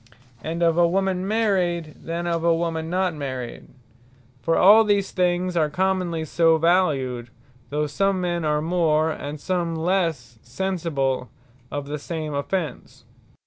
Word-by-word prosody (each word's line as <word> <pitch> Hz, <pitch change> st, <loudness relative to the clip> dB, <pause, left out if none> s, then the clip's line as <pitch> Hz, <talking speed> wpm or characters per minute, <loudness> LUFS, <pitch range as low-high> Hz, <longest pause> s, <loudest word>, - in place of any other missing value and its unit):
And 165 Hz, +2 st, -2 dB
of 165 Hz, 0 st, +3 dB
a 170 Hz, -, +5 dB
woman 190 Hz, +1 st, 0 dB
Married, 185 Hz, -7 st, 0 dB
than 170 Hz, +1 st, -3 dB
of 170 Hz, -1 st, -1 dB
a 170 Hz, -1 st, +4 dB
woman 165 Hz, -1 st, -2 dB
not 185 Hz, 0 st, 0 dB
married. 130 Hz, -5 st, -6 dB, 0.7 s
For 165 Hz, -, +1 dB
all 210 Hz, +4 st, +8 dB
these 205 Hz, -2 st, +1 dB
things 180 Hz, 0 st, 0 dB
are 155 Hz, -3 st, +2 dB
commonly 180 Hz, -1 st, -1 dB
so 165 Hz, +1 st, +3 dB
valued; 145 Hz, -8 st, +1 dB, 0.4 s
though 150 Hz, +1 st, 0 dB
some 195 Hz, +6 st, 0 dB
men 175 Hz, -2 st, -1 dB
are 150 Hz, -1 st, +1 dB
more, 160 Hz, -2 st, +2 dB
and 145 Hz, 0 st, -6 dB
some 170 Hz, 0 st, -1 dB
lesse 160 Hz, -, -1 dB
sensible 135 Hz, -4 st, -2 dB, 0.4 s
of 145 Hz, -1 st, -4 dB
the 145 Hz, +1 st, -5 dB
same 155 Hz, 0 st, -5 dB
offence. 145 Hz, 0 st, -4 dB
165 Hz, 145 wpm, -23 LUFS, 150-180 Hz, 0.7 s, all